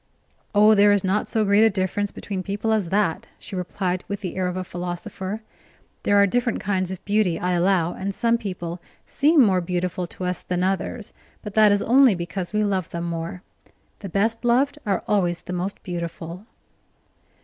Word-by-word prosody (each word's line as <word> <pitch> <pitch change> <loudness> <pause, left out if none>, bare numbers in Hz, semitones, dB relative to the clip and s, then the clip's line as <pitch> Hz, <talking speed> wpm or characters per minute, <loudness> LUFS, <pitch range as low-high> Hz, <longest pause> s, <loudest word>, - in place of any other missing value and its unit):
"Oh, 210 +1 +7
there 205 0 +6
is 205 -2 +2
not 195 +2 0
so 220 -1 +1
great 200 +2 +5
a 225 - +6
difference 195 +1 -1
between 195 -2 -5
people 205 +4 -1
as 205 -6 0
that," 200 +1 0
she 200 - -8
replied, 180 0 -2
with 200 0 -4
the 185 -4 -5
air 185 -1 0
of 180 0 -3
a 185 - -2
philosopher. 180 +4 -5 0.6
"There 205 - +3
are 200 - +6
different 240 +3 0
kinds 185 -2 -1
of 190 -1 -7
beauty, 205 -5 +2
I 180 - -1
allow, 175 -1 +2
and 195 +1 -3
some 230 +3 +1
people 180 -5 -5 0.2
seem 295 0 +4
more 185 -3 +2
beautiful 180 0 -2
to 185 - -8
us 180 0 -2
than 180 0 -2
others, 195 +3 -2 0.3
but 210 - -7
that 215 -1 +6
is 205 0 +2
only 255 -2 +5
because 175 +1 -4
we 210 0 +1
love 190 -4 -1
them 170 0 -4
more. 170 +2 -4 0.6
The 200 - -7
best 220 +6 0
loved 265 +5 +2
are 195 -3 0
always 175 -5 +1
the 180 - -6
most 180 +2 -4
beautiful." 170 +2 -6
195 Hz, 190 wpm, -23 LUFS, 180-210 Hz, 0.6 s, Oh